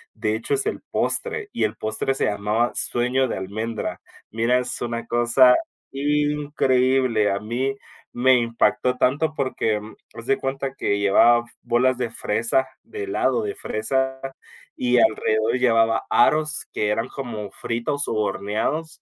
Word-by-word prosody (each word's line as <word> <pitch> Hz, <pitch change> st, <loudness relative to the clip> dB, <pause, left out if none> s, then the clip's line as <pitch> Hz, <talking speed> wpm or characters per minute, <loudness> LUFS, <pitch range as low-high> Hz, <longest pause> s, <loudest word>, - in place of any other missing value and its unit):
de 105 Hz, 0 st, -1 dB
hecho, 115 Hz, +5 st, -1 dB
es 135 Hz, -, -1 dB
el -, -, -3 dB
postre, 450 Hz, -3 st, -1 dB
y -, -, -1 dB
el 110 Hz, +1 st, 0 dB
postre 110 Hz, +6 st, -2 dB
se -, -, 0 dB
llamaba 105 Hz, +4 st, 0 dB
"sueño 125 Hz, +2 st, 0 dB
de -, -, -3 dB
almendra", 110 Hz, +4 st, -4 dB, 0.3 s
mira, 115 Hz, +3 st, +2 dB
es 125 Hz, -, -2 dB
una 115 Hz, -1 st, -3 dB
cosa 120 Hz, +2 st, +5 dB, 0.4 s
increíble, 135 Hz, -5 st, +1 dB
a 100 Hz, 0 st, -1 dB
mí 125 Hz, +5 st, -2 dB, 0.4 s
me 130 Hz, +2 st, +4 dB
impactó 120 Hz, +2 st, +1 dB
tanto, 155 Hz, +5 st, +1 dB
porque 115 Hz, -5 st, -1 dB, 0.4 s
haz 115 Hz, 0 st, -9 dB
de 135 Hz, -, +2 dB
cuenta 135 Hz, 0 st, -3 dB
que 100 Hz, -6 st, -1 dB
llevaba 120 Hz, +4 st, +4 dB, 0.2 s
bolas 125 Hz, +1 st, +2 dB
de 120 Hz, -2 st, -1 dB
fresa, 115 Hz, +4 st, 0 dB, 0.2 s
de 420 Hz, -1 st, -7 dB
helado 420 Hz, +3 st, 0 dB
de 410 Hz, -1 st, -3 dB
fresa, 130 Hz, +4 st, -2 dB, 0.6 s
y 125 Hz, 0 st, +1 dB
alrededor 110 Hz, +1 st, +2 dB
llevaba 115 Hz, -2 st, +3 dB
aros, 155 Hz, +4 st, +2 dB
que 105 Hz, -, 0 dB
eran 115 Hz, +2 st, -1 dB
como 110 Hz, -7 st, -6 dB
fritos 140 Hz, +5 st, -3 dB
u 115 Hz, -, -2 dB
horneados, 110 Hz, +10 st, -2 dB
120 Hz, 145 wpm, -23 LUFS, 110-135 Hz, 0.6 s, cosa